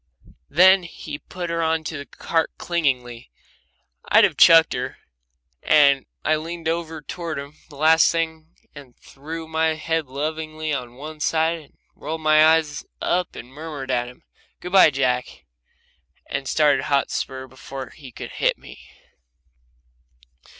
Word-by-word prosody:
Then 190 +4 +6
he 155 -4 -8
put 175 -2 -6
her 165 0 -1
into 160 0 -1
the 140 -1 -7
cart 165 -1 -1
clingingly 125 -8 -2 0.8
I'd - - +6
have - - +3
chucked 165 -1 +7
her 125 +1 -4 0.6
and 140 -3 +4 0.2
I 155 0 +3
leaned 165 +1 -6
over 160 -2 -3
toward 165 -1 -5
him 140 +2 -8
the 145 - -14
last 160 +2 +5
thing 160 -1 -3 0.3
and 140 -4 -14
threw 160 +4 -9
my 160 0 0
head 160 -1 -2
lovingly 155 +3 -4
on 125 -3 -5
one 155 +3 -9
side 160 +2 +1
and 150 - -19 0.2
rolled 160 +2 -6
my 155 0 +5
eyes 155 -2 +3 0.2
up 180 0 -1
and 120 - -9
murmured 145 -3 -6
at 120 -1 0
him, 125 - -14 0.4
"Good 180 - -7
bye, 190 -4 +7
Jack," 130 -3 -2 0.8
and 135 - -4
started 150 -2 +3
Hotspur 135 -1 -1
before 130 +1 -9
he 140 -5 -13
could - - -8
hit - - 0
me. - - -13
155 Hz, 145 wpm, -22 LUFS, 140-160 Hz, 0.8 s, chucked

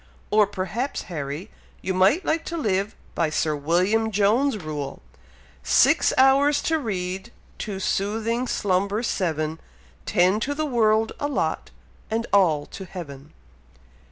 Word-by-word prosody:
Or 210 -1 +5
perhaps, 210 +7 -3
Harry, 150 +3 -6 0.3
you 190 - -1
might 195 - +3
like 320 +1 0
to 335 - -4
live 200 - -1 0.2
by 165 -2 +1
Sir 155 0 0
William 180 +9 +1
Jones' 215 +6 +2
rule: 150 -6 -5 0.6
'Six - - +4
hours 275 +2 +5
to 320 0 +1
read, 190 -3 -4 0.3
to 200 -3 -4
soothing 225 +6 -1
slumber 200 +1 0
seven, 160 -7 -1 0.5
Ten 185 +4 +3
to 285 +5 -2
the 310 +1 -1
world 225 -4 +2
allot 275 - -1 0.4
and 225 +1 -1
all 165 -7 +4
to 190 - -9
Heaven.'" 150 -5 -9
200 Hz, 130 wpm, -24 LUFS, 175-235 Hz, 0.6 s, Or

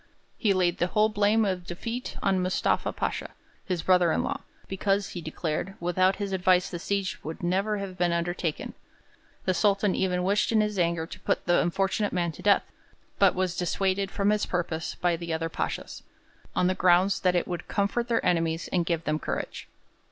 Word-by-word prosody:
He 215 - +1
laid 180 -2 +1
the 175 - +2
whole 215 +3 +3
blame 210 +1 +3
of 185 -2 -2
defeat 230 +8 -5
on 190 -2 +2
Mustafa 185 +1 +1
Pasha, - - -3 0.3
his 180 -3 -2
brother 180 -2 +4
in - - +1
law, - - -3 0.3
because, 195 +1 0
he 175 - -6
declared, 160 +4 -3
without 185 +2 +2
his 200 -1 -4
advice 185 -1 +3
the 175 - -4
siege 195 -2 -2
would 160 +2 -6
never 195 +4 +1
have 190 -2 -6
been 175 -1 +2
undertaken. 170 -1 -2 0.7
The 185 - +2
Sultan 200 0 +2
even 180 -1 0
wished 200 +4 +2
in 220 - +4
his 210 -2 0
anger 170 -1 +1
to - - -10
put - - -1
the 175 0 +4
unfortunate 195 +3 0
man 175 -2 0
to 155 - -12
death, 205 -1 +4 0.6
but 195 -2 +5
was 185 -1 0
dissuaded 190 +2 0
from 200 +1 +1
his 210 0 0
purpose 170 -2 -2
by 175 -1 +1
the 170 0 -5
other 165 +1 -2
pashas, - - -4 0.5
on - - +2
the 185 - +3
ground 185 +1 +3
that 180 -1 +2
'it 175 - +1
would 175 -1 -5
comfort 210 +3 0
their 235 -2 0
enemies 165 -2 +1
and 175 -3 +1
give 165 -2 0
them 155 -1 -1
courage.' - - -4
185 Hz, 190 wpm, -27 LUFS, 175-200 Hz, 0.7 s, but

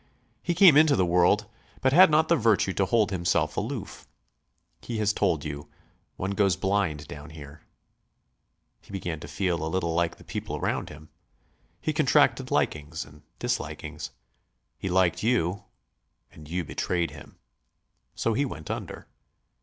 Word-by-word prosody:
He 175 - -1
came 175 -7 +8
into 155 -2 +6
the 95 - +2
world, 90 +4 +3 0.3
but 130 0 +2
had 180 +3 +8
not 155 +1 +3
the 170 - +4
virtue 110 - +2
to 100 - +1
hold 110 0 +2
himself 85 -2 0
aloof. - - -5 0.7
He 115 - -5
has 105 -1 +1
told 85 -9 0
you, 70 -1 -6 0.5
'One 95 +1 -3
goes 100 -2 +2
blind 95 -6 -1
down 75 +2 -9
here.' 75 -1 -11 1.2
He - - -24
began 90 -5 -4
to 75 - -9
feel 85 +1 -1
a 80 - -2
little 85 -1 -1
like 85 0 0
the - - -15
people - - -5
round - - -2
him. 75 +1 -13 0.7
He - - -2
contracted - - +3
likings 75 +2 -1
and 75 0 -17 0.2
dislikings. - - -4 0.7
He 95 - -3
liked 90 -1 +2
you... 100 -5 0 0.7
and 75 -1 -14
you 90 +1 -2
betrayed 85 +2 -2
him. - - -13 0.8
So 115 - 0
he 135 +6 +1
went 80 - -5
under. - - -6
90 Hz, 155 wpm, -27 LUFS, 80-105 Hz, 1.2 s, came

